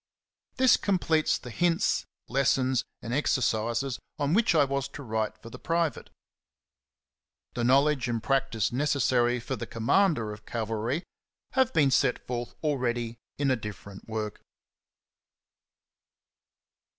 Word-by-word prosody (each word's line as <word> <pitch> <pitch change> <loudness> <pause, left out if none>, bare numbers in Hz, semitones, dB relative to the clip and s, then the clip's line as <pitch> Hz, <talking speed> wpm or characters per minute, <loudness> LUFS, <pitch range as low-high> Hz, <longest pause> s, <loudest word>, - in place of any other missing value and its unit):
This 260 -1 +5
completes 165 -5 +1
the 125 - -10
hints, 170 +6 +1 0.2
lessons, 130 -1 +2 0.2
and 115 - -4
ex 145 +1 +2
ercises 120 +2 0 0.2
on 145 +1 0
which 220 -3 +3
I 150 - +6
was 140 0 -1
to 145 - -9
write 110 -2 -2
for 115 +1 -12
the - - -9
pri 165 -1 +1
vate. - - -13 1.4
The 120 - -2
knowledge 135 +1 +3
and 115 -2 -2
practice 135 -6 +1
necessary 125 -2 +2
for 130 +3 -4
the 120 - -6
commander 115 - +2
of 105 - -12
cavalry 115 - -2 0.5
have 260 -1 +2
been 145 - +3
set 130 -1 +3
forth 120 -1 -4
already 120 -5 -1 0.2
in 140 -2 +1
a - - +4
different 100 -3 -9
work. 110 -1 -4
130 Hz, 130 wpm, -28 LUFS, 115-145 Hz, 1.4 s, I